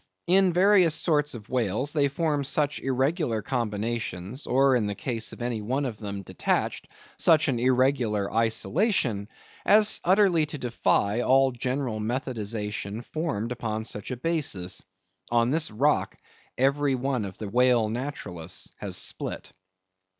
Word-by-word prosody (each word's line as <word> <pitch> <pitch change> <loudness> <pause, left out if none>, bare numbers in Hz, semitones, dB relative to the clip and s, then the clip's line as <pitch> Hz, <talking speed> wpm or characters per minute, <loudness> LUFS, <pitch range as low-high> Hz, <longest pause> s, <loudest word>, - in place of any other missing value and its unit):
In 185 +1 +4
various 180 -2 +4
sorts 150 -4 +1
of 105 -3 -10
whales, 125 +3 -1
they 145 -3 +3
form 145 0 -1
such 145 +1 0
irregular 130 - 0
combinations; 115 -1 -3
or, 135 +1 +4
in 110 -4 +1
the 100 - -3
case 115 -1 -3
of - - -7
any 120 -3 -2
one 130 +7 -1
of 115 -5 -5
them 100 -2 -5
detached, - - -2 0.3
such 160 -1 +4
an 130 -4 0
irregular 125 -5 +1
isolation; 115 - +1 0.3
as 215 +1 +5
utterly 180 -4 +4
to 150 - -6
defy 120 -3 +1
all 135 +1 +4
general 125 -2 -2
methodization 110 -2 -4
formed 140 -8 -3
upon 110 -2 -3
such 105 -3 -4
a 125 - -4
basis. 125 - -2 0.5
On 120 +1 +2
this 155 +1 +3
rock 135 +8 +1 0.4
every 140 +1 +2
one 130 -2 -1
of 95 -2 -7
the 110 - -6
whale 120 +1 +3
naturalists 105 - -5
has - - -3
split. - - -4
125 Hz, 140 wpm, -26 LUFS, 110-145 Hz, 0.5 s, as